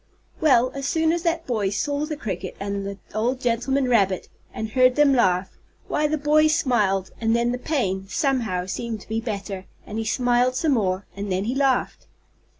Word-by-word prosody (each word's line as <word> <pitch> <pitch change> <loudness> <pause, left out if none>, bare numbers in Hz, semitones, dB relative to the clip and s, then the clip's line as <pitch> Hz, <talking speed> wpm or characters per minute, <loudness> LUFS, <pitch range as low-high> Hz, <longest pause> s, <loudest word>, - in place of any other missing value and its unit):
Well, 255 -5 +4
as 275 0 -4
soon 320 +1 +2
as 340 0 0
that 335 -1 -1
boy 215 -6 0
saw 285 +8 -1
the 305 -1 -4
cricket 190 - -5
and 200 0 -3
the 200 0 -6 0.2
old 240 +5 0
gentleman 255 +3 0
rabbit, 195 -6 +2 0.2
and 220 0 -4
heard 255 +1 +4
them 295 -2 +5
laugh, 185 -6 +1 0.3
why 300 - +1
the 310 +1 0
boy 305 +1 +4
smiled, 225 - +1
and 225 0 +2
then 235 0 +1
the 250 - -3
pain, 195 -11 -1
somehow, 240 - 0
seemed 220 +3 -4
to - - -15
be 225 +1 -2
better, 200 -4 -5 0.2
and 215 +1 -5
he - - -1
smiled 245 +2 +2
some 310 +3 +1
more, 195 -6 0
and 200 0 -4
then 185 +1 0
he 235 +4 -1
laughed. 270 -2 0
240 Hz, 190 wpm, -23 LUFS, 200-275 Hz, 0.3 s, them